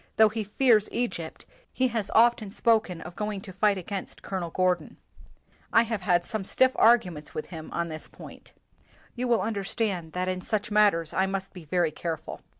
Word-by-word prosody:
Though 220 -1 +6
he 220 0 -3
fears 215 0 +3
Egypt, 230 -9 -4 0.3
he 255 0 +1
has 225 -4 -2
often 230 -2 +4
spoken 215 -5 +1
of 175 - -9
going 210 -1 -3
to 190 - -10
fight 200 +1 +2
against 190 +1 -6
Colonel 185 -3 -3
Gordon. 180 -2 0 0.7
I 225 - +6
have 225 -3 -3
had 175 -1 +2
some 220 -4 -3
stiff 260 +6 +3
arguments 180 -10 +3
with 155 - -5
him 160 -2 -8
on 170 0 -2
this 155 0 -7
point. - - -13 0.6
You 250 +1 -2
will 235 -4 +3
understand 200 -5 -2
that 180 0 -2
in 185 0 -2
such 210 +2 -2
matters 200 -6 +3
I 190 0 +2
must 195 0 -4
be 180 -4 -11
very 170 +1 +1
careful. 160 0 -5
195 Hz, 180 wpm, -27 LUFS, 175-220 Hz, 0.7 s, Though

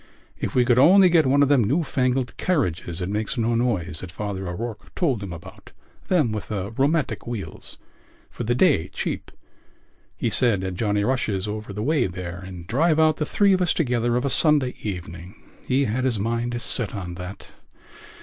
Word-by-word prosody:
If - - -3
we 125 -1 +4
could 120 0 +4
only 185 +6 +7
get 165 -5 +4
one 140 +2 +4
of - - +3
them 140 -5 +4
new 140 +11 +1
fangled 130 -3 -1
carriages 90 - -1
that 90 -1 -3
makes 105 +4 -2
no 115 0 +1
noise 100 -9 -1
that 95 - -7
Father 95 -1 -4
O'Rourke 105 +5 -6
told 135 - 0
him 100 -3 -6
about, 85 -2 -11 0.3
them 155 - +2
with 105 -1 -4
the 100 -1 -4
rheumatic 140 +5 0
wheels, 100 -9 -7 0.5
for - - -6
the 120 +2 0
day 125 - +3
cheap—he 115 - -7
said, 105 -4 +2
at 95 -1 -3
Johnny 105 +1 0
Rush's 105 -5 -1
over 105 0 -5
the 105 +2 -4
way 145 -3 +2
there 90 -1 -6
and 90 -2 -9
drive 155 - +2
out 155 -1 +4
the 150 - -2
three 200 -1 +3
of 185 - +1
us 175 - +2
together 120 -5 +1
of 125 - -1
a 140 - 0
Sunday 145 -5 +3
evening. 90 -1 -6 0.3
He 135 +2 +2
had 125 +3 -1
his 125 -4 +1
mind 115 +3 -2
set 120 -3 +2
on 90 -3 -5
that.... 90 +2 -9
115 Hz, 190 wpm, -23 LUFS, 95-135 Hz, 0.5 s, only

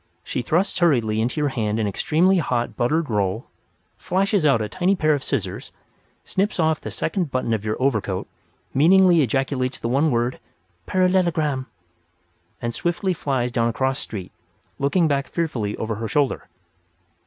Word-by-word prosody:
She - - -3
thrusts 175 - 0
hurriedly 115 -11 +2
into 125 +7 -1
your 145 -1 +1
hand 110 -4 -1
an 110 - 0
extremely 170 - +2
hot 125 -6 -1
buttered 150 +6 +1
roll, 105 0 -1 0.5
flashes 195 -3 +1
out 135 -5 +4
a 110 - -2
tiny 185 - +1
pair 155 -4 +2
of 140 -2 -2
scissors, - - -3 0.5
snips 195 0 -1
off 160 -1 +2
the - - -5
second 170 -1 -2
button 130 -3 -1
of 110 -2 -1
your 110 0 -2
overcoat, 110 -8 0 0.5
meaningly 175 +3 +5
ejaculates 135 0 0
the - - -3
one 140 +6 +2
word, 120 -1 0 0.5
"parallelogram!" 170 -7 +1 0.9
and 120 0 -3
swiftly 175 - -1
flies 130 -6 -1
down 115 0 +1
a - - -3
cross 130 +3 0
street, 95 -4 -7 0.5
looking 160 +5 +2
back 140 -2 0
fearfully 125 -12 -2
over 110 0 -2
her 115 +1 -3
shoulder. 140 +3 0
135 Hz, 155 wpm, -22 LUFS, 115-170 Hz, 0.9 s, meaningly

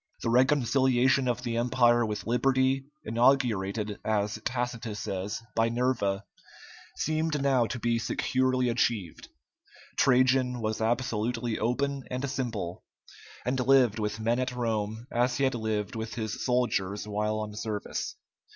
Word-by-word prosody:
The 115 - +1
reconciliation 130 0 +3
of 120 0 -1
the 115 -1 -2
Empire 120 0 +3
with 105 -3 -3
liberty, 130 +3 +2 0.2
inaugurated, 110 -4 +1
as 105 0 -1
Tacitus 120 -3 -3
says, 100 +3 -4
by 115 0 +3
Nerva, 115 -5 0 0.7
seemed 155 -1 0
now 135 -4 +2
to 120 - -4
be 115 0 0
securely 130 +2 +1
achieved. 115 -7 -1 0.7
Trajan 125 0 +3
was 110 0 -2
absolutely 115 0 -1
open 135 +4 -1
and 130 +2 -2
simple, 115 -10 -4 0.6
and 130 +1 0
lived 125 -4 +4
with 105 0 -2
men 115 +2 +1
at 130 0 -2
Rome 110 -1 -2
as 120 +1 +1
he 140 - 0
had 135 - +2
lived 110 -3 -2
with 110 -1 -5
his 110 -2 -4
soldiers 105 -6 0
while 105 +1 -1
on 105 -1 -5
service. 105 -2 -4
120 Hz, 135 wpm, -28 LUFS, 110-130 Hz, 0.7 s, lived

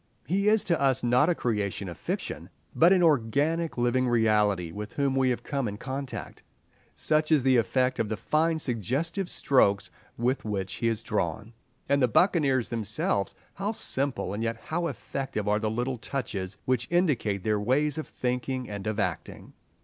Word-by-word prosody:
He 195 +5 0
is 215 -1 +4
to 170 -7 0
us 135 -3 +2
not 125 +6 +4
a 175 - +2
creation 105 -6 -2
of 85 - -6
fiction, - - -4 0.3
but 170 +3 +6
an 185 -2 +5
organic 155 +3 +2
living 120 +1 +2
reality 105 -6 +2
with 105 +4 -7
whom 140 -2 0
we 130 -1 +3
have 125 - -1
come 140 -4 -2
in 105 0 -5
contact; 135 +2 -6 0.5
such 155 0 +1
is 150 -5 +4
the 130 -1 +4
effect 125 +4 +1
of 110 - 0
the 110 - -2
fine 160 +7 +1
suggestive 145 - -2
strokes 100 -7 +2 0.3
with 125 +3 0
which 95 -3 -3
he 115 - +2
is 115 0 -1
drawn. 110 0 -2 0.3
And 140 0 +2
the 125 - +5
buccaneers 135 - +3
themselves, 105 -3 -1 0.2
how 200 +4 -2
simple 130 - -1
and 105 - -3
yet 115 0 -1
how 170 +8 -2
effective 135 -10 -4
are 105 0 +2
the 110 0 -1
little 120 +3 -2
touches 105 -8 -4
which 125 -1 0
indicate 135 - +1
their 105 -1 +1
ways 140 +7 +1
of 155 - -5
thinking 125 0 -2
and 100 0 -6
of 110 0 -2
acting. - - -4
125 Hz, 175 wpm, -27 LUFS, 110-145 Hz, 0.5 s, but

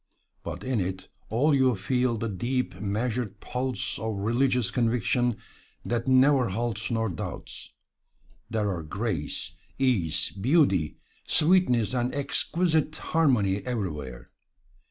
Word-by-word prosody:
But 85 +3 -6
in 130 -3 0
it 95 0 -3 0.2
all 140 +8 +3
you 130 -3 +4
feel 120 +4 0
the 115 - -2
deep, 120 +5 -2
measured 105 0 -2
pulse 125 +2 -3
of - - -4
a 110 - 0
religious 120 +3 +1
conviction 120 0 +1 0.5
that 120 0 -1
never 130 -1 +5
halts 110 +1 -2
nor 115 -1 0
doubts. 90 -6 -6 0.7
There 105 -3 0
are 85 - -4
grace, 85 -1 -3 0.3
ease, 120 - +1
beauty, 100 - +2 0.3
sweetness 150 - +3
and 125 +1 0
exquisite 155 +2 +1
harmony 125 -14 +2
everywhere. 75 - -4
120 Hz, 115 wpm, -27 LUFS, 100-130 Hz, 0.7 s, never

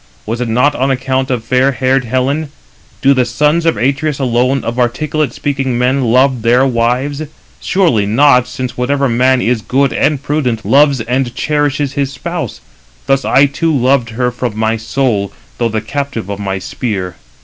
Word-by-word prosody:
Was 115 +3 -3
it 120 - -2
not 125 +6 +2
on 135 0 0
account 130 0 -1
of 125 -4 -1
fair 130 +4 +2
haired 130 0 +1
Helen? 135 +6 -1 0.5
Do 135 +1 +5
the 130 -2 +2
sons 150 +7 +1
of 165 - +2
Atreus 140 +3 0
alone, 125 +1 0
of 115 +2 -3
articulate 145 +3 0
speaking 135 -2 -2
men, 130 +2 +1
love 130 +1 +2
their 120 +4 +3
wives? 130 +4 0 0.4
[Surely 125 - +1
not], 125 +2 +4
since 125 0 -5
whatever 140 +3 0
man 125 +1 +2
is 120 -1 0
good 135 +4 +1
and 145 -1 0
prudent 130 -7 -1
loves 140 -2 +4
and 125 +1 -2
cherishes 145 -1 -1
his 140 -1 -1
spouse; 125 - -5 0.4
thus 135 0 +1
I 140 - +4
too 155 +4 -1
loved 125 -1 +2
her 125 +2 -1
from 120 -3 -4
my 110 +1 +1
soul, 110 -3 -1 0.3
though 120 -1 +1
the 110 -1 -2
captive 125 -3 -4
of 100 - -5
my 95 -1 -2
spear. 95 -2 -4
130 Hz, 170 wpm, -14 LUFS, 120-140 Hz, 0.5 s, Do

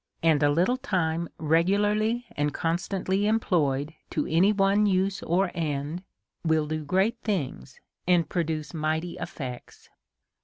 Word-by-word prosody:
And 160 -3 +4
a 145 - +4
little 175 - +2
time, 170 -7 -1
re 160 +2 +3
gularly 210 +5 +1
and 145 0 0
constantly 190 +4 0
employed 160 -9 +1 0.2
to 150 - -1
any 180 +6 +4
one 200 +1 +3
use 190 0 +1
or 180 +2 +1
end, 155 0 -2 0.4
will 160 -2 +2
do 155 0 -3
great 190 +9 +1
things, 140 - -3 0.3
and 175 -3 +3
produce 160 -3 -2
mighty 160 +2 -2
effects. 125 -4 -7
170 Hz, 130 wpm, -27 LUFS, 155-195 Hz, 0.4 s, And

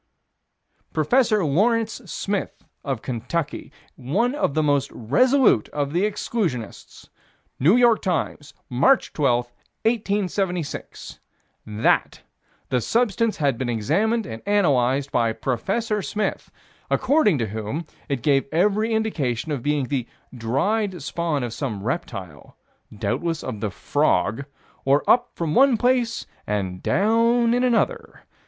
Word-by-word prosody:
Prof. 235 - +2
Lawrence 215 - +1
Smith, 195 +3 -4 0.2
of 135 -5 -3
Kentucky, 130 +6 -3 0.2
one 190 - 0
of 290 - -1
the 155 - +2
most 145 -2 +1
resolute 245 - +3
of 145 -1 -3
the 180 +4 +2
exclusionists: 170 - -4 0.5
New 165 - +5
York 240 -2 +4
Times, 155 -4 -3
March 140 - +2
12, 120 -4 +1 0.3
1876: 195 -6 -2 0.5
That 105 +1 +1 0.5
the 125 - +1
substance 230 - +1
had 140 -6 0
been 130 -2 -2
examined 210 - +1
and 110 - -7
analyzed 140 -9 +2
by 115 -2 +1
Prof. 120 0 -3 0.3
Smith, 210 0 -3 0.4
according 265 - +3
to 115 -4 -2
whom 110 - -4 0.2
it 135 -4 -2
gave 140 -1 +2
every 210 +7 +2
indication 155 - -1
of 140 -4 -2
being 145 0 0
the 130 -4 -2 0.3
"dried" 175 - -1
spawn 160 -3 -2
of 120 -2 -4
some 110 -6 -4
reptile, 95 - -5 0.3
"doubtless 150 +11 -2
of 120 -5 -5
the 105 0 -2
frog" 105 +6 0 0.4
or 140 +2 +2
up 245 0 +4
from 165 -3 -2
one 265 +1 +5
place 245 -1 +1 0.2
and 95 -3 -2
down 230 +4 +3
in 245 +1 +2
another. 455 - 0
155 Hz, 120 wpm, -23 LUFS, -, 0.5 s, New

